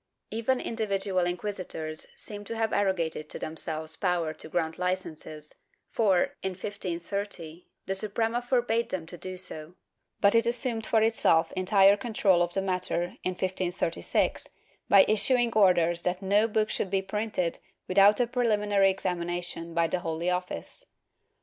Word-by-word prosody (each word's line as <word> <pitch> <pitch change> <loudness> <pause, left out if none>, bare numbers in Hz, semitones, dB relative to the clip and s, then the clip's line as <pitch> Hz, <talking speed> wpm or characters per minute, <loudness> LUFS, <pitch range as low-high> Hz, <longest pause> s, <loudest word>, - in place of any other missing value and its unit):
Even 230 +4 0
individual 195 -5 -1
inquisitors 175 -4 -4
seem 205 -1 -7
to 230 - -5
have 225 -1 -1
arrogated 170 -6 0
to - - -4
themselves 160 0 -4
power 175 -3 0
to 160 - -10
grant 160 0 -2
licences 160 -4 -4 0.4
for, 195 -6 +2
in 190 - -2
1530, 180 -2 -5 0.2
the 190 - -1
Suprema 225 +4 -1
forbade 240 -2 0
them 175 -4 -3
to 170 - -10
do 185 +1 -7
so, 170 -2 -8 0.4
but 200 - +4
it 230 0 +3
assumed 235 -2 +1
for 220 -1 +3
itself 170 -7 +3
entire 195 +1 +5
control 200 -4 +2
over 175 0 0
the 195 - 0
matter, 180 -2 -1
in 185 - -1
1536, 180 -2 -1 0.4
by 195 -1 +8
issuing 235 +2 +2
orders 175 -4 +4
that 180 +2 -2
no 205 +3 +3
book 215 -1 0
should 190 - -1
be 195 0 0
printed 195 -3 -2 0.3
without 200 +3 +5
a 245 - +4
preliminary 210 -5 +2
examination 175 -2 -3
by 170 0 +3
the 170 +3 -1
Holy 165 +1 -2
Office. 180 - -3
190 Hz, 145 wpm, -28 LUFS, 175-210 Hz, 0.4 s, by